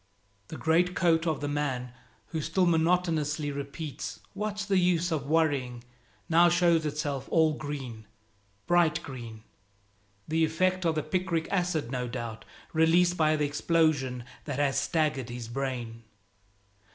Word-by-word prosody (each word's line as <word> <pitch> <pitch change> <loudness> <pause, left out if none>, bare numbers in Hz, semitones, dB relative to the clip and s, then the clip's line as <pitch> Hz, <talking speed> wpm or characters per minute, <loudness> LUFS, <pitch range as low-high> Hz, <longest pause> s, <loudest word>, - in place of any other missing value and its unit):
The 160 - -7
greatcoat 170 0 +2
of 155 -3 0
the 145 - -2
man 130 -4 -2 0.4
who 160 - -3
still 165 +5 +1
monotonously 160 -3 +1
repeats, 140 +1 -6
"What's 210 +1 -3
the 195 -2 +2
use 175 -1 +2
of 145 -4 -2
worrying?" 140 -6 +1 0.4
now 170 +1 +5
shows 170 -2 +3
itself 145 -2 -3
all 160 -1 +4
green, 135 -8 -6 0.6
bright 170 -1 +3
green, 115 -6 -8 0.8
the 160 +1 +1
effect 185 +3 +1
of 165 -1 +2
the 155 - -1
picric 170 0 -1
acid 175 -9 0
no 125 -2 -2
doubt 115 -2 -6 0.3
released 170 +2 +4
by 155 -2 +3
the 150 -1 +1
explosion 145 -4 +1 0.2
that 145 -3 -3
has 145 -1 +2
staggered 150 -6 0
his 120 -1 -6
brain. 120 -2 -4
155 Hz, 135 wpm, -28 LUFS, 135-170 Hz, 0.8 s, now